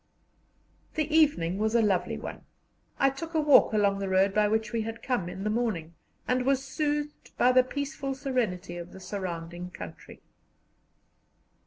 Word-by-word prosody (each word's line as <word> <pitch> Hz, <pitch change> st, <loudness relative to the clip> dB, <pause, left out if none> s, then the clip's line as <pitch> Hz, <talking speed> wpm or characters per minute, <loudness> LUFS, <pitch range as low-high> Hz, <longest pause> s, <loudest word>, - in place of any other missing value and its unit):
The 310 Hz, -1 st, 0 dB
evening 200 Hz, -, +3 dB
was 220 Hz, +2 st, +1 dB
a 235 Hz, -, +5 dB
lovely 185 Hz, -4 st, +1 dB
one. -, -, -7 dB, 0.6 s
I 275 Hz, 0 st, +4 dB
took 325 Hz, +5 st, -7 dB
a -, -, +4 dB
walk 295 Hz, -2 st, +6 dB
along 200 Hz, -2 st, +2 dB
the 195 Hz, -1 st, -2 dB
road 190 Hz, +1 st, +3 dB
by 210 Hz, 0 st, +3 dB
which 220 Hz, +2 st, -1 dB
we 230 Hz, -, +1 dB
had 225 Hz, +1 st, -6 dB
come 240 Hz, -10 st, -1 dB
in 190 Hz, +2 st, -6 dB
the 210 Hz, -, 0 dB
morning, 210 Hz, -9 st, -1 dB, 0.3 s
and 250 Hz, 0 st, +1 dB
was 270 Hz, 0 st, +2 dB
soothed 295 Hz, +1 st, -3 dB
by 250 Hz, -, +5 dB
the 255 Hz, 0 st, +6 dB
peaceful 280 Hz, +1 st, -4 dB
serenity 220 Hz, -11 st, -2 dB
of 175 Hz, +1 st, -8 dB
the 190 Hz, -, -10 dB
surrounding 175 Hz, -3 st, -5 dB
country. 90 Hz, -, -10 dB
220 Hz, 165 wpm, -28 LUFS, 185-270 Hz, 0.6 s, walk